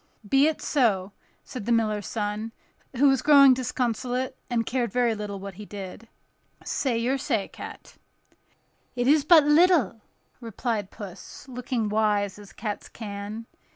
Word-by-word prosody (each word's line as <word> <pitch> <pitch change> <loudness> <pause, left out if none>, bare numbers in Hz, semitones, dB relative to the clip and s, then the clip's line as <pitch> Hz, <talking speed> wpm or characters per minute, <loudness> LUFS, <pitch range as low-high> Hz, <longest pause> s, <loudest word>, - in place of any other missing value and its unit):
"Be 270 +6 +4
it 315 - -2
so," 210 -9 +1 0.3
said 240 -5 -8
the - - +1
miller's 215 -3 +1
son, 215 +1 -3 0.4
who 280 +4 +4
was 270 -1 +3
growing 280 -2 +7
disconsolate, 250 0 -2
and 235 -2 0
cared 240 -3 -1
very 240 -1 +2
little 205 -2 -5
what 195 0 -7
he 210 +4 -10
did: 200 +2 -8 0.6
"Say 255 -5 -1
your 255 +4 0
say, 210 -5 -1
cat." - - -11 1.0
"It 245 0 0
is 295 +1 +5
but 315 0 +7
little," 295 - +4 0.4
replied 225 -3 -3
Puss, 200 +5 -10
looking 250 -3 -3
wise, 210 -2 0
as 205 -1 -13
cats 210 -2 -5
can. 210 +1 -7
230 Hz, 145 wpm, -26 LUFS, 210-260 Hz, 1.0 s, growing